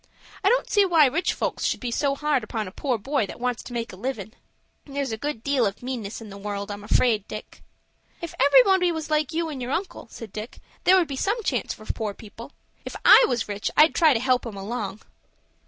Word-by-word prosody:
I 395 - +5
don't - - +2
see 410 - +4
why 335 -5 +5
rich 305 +7 +1
folks - - -3
should - - 0
be 245 -2 -4
so 275 +3 0
hard 295 -4 0
upon 215 -1 -4
a - - -8
poor 255 +3 -1
boy 265 0 -1
that - - -9
wants 245 -1 -2
to - - -11
make 235 -3 -4
a - - -8
livin'." 215 0 -5 0.5
"There's 280 -3 -4
a - - -1
good 235 -1 -4
deal 280 -2 +1
of 200 +4 -6
meanness 235 -5 -5
in 215 -2 -10
the 200 - -9
world, 200 0 -4
I'm 205 0 -7
afraid, 215 -1 +2
Dick." 215 - -9 0.6
"If 335 -2 -6
everybody 365 - +5
was 320 -1 -5
like 305 -1 +1
you 330 0 -1
and 280 -4 -6
your 245 - -4
uncle," 365 +7 -3
said 225 -4 -10
Dick, 215 +2 -7 0.3
"there 375 +1 +7
would 350 -3 +2
be 280 - -5
some 415 - -1
chance 250 - -1
for 215 - -14
poor 215 -2 -3
people. 230 +4 -11 0.3
If - - -7
I - - +9
was 240 -4 -1
rich 205 0 -3
I'd 310 +2 +7
try 315 -5 +4
to - - +1
help 255 0 +1
'em 210 -3 -7
along." 210 0 -5
250 Hz, 230 wpm, -24 LUFS, 215-300 Hz, 0.6 s, I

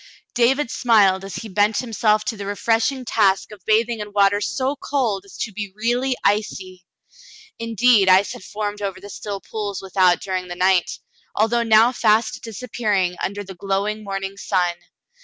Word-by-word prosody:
David 250 +2 +2
smiled 200 -5 +3
as 195 - -7
he 225 - -6
bent 205 +1 +1
himself 215 -3 +1
to 225 - -2
the 200 -1 -7
refreshing 225 +5 0
task 200 -4 +1
of 210 -2 -12
bathing 225 +1 +2
in 210 0 -6
water 205 0 +3
so 265 +5 -1
cold 235 -9 -2
as 195 - -14
to 220 - -3
be 205 -1 -5
really 245 +4 0
icy. 190 -3 -1 0.8
Indeed, 230 -3 +3
ice 190 +2 +4
had - - -11
formed 205 +1 -5
over 195 -2 -3
still 200 -1 -6
pools 205 -3 -5
without 185 -2 +2
during 185 -1 -4
the 175 - -6
night, 185 0 +2 0.5
although 225 +3 +2
now 225 +1 +5
fast 220 -2 +1
disappearing 215 -5 -2
under 205 +1 -3
the 190 -1 -10
glowing 200 +3 -2
morn 195 -1 -4
ing 195 0 -6
sun. 180 -3 0
210 Hz, 165 wpm, -21 LUFS, 195-225 Hz, 0.8 s, now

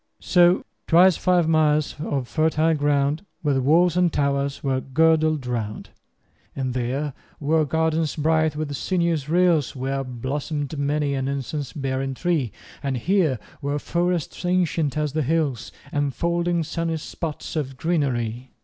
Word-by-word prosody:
5 - - -19
So 175 +1 +4 0.2
twice 180 +1 +6
five 175 -1 +2
miles 155 -2 +2
of 140 -4 -2
fertile 160 +2 +2
ground 145 +2 +1 0.2
With 140 -3 +2
walls 165 +6 +4
and 180 -1 +3
towers 140 -1 -1
were 135 -2 0
girdled 155 0 +2
round: 115 -4 -4 0.6
And 130 -2 -2
there 130 +4 -2 0.3
were 155 +1 +2
gardens 160 +1 0
bright 160 0 +2
with 150 -2 -3
sinuous 170 -4 0
rills 170 -5 +2
Where 135 +1 -2
blossom'd 140 +4 -4
many 145 0 0
an 135 -1 -1
incense 140 0 -3
bearing 135 -1 -2
tree; 155 - 0 0.3
And 135 -2 -1
here 165 - +2 0.2
were 145 0 -1
forests 175 +2 -1
ancient 170 -5 +1
as 150 -2 -1
the 155 - 0
hills, 140 -5 -1 0.2
10 145 0 +1
Enfolding 170 +5 0
sunny 165 +1 -2
spots 155 0 -6
of 135 -4 -3
greenery. 130 -7 -1
150 Hz, 140 wpm, -23 LUFS, 135-165 Hz, 0.6 s, twice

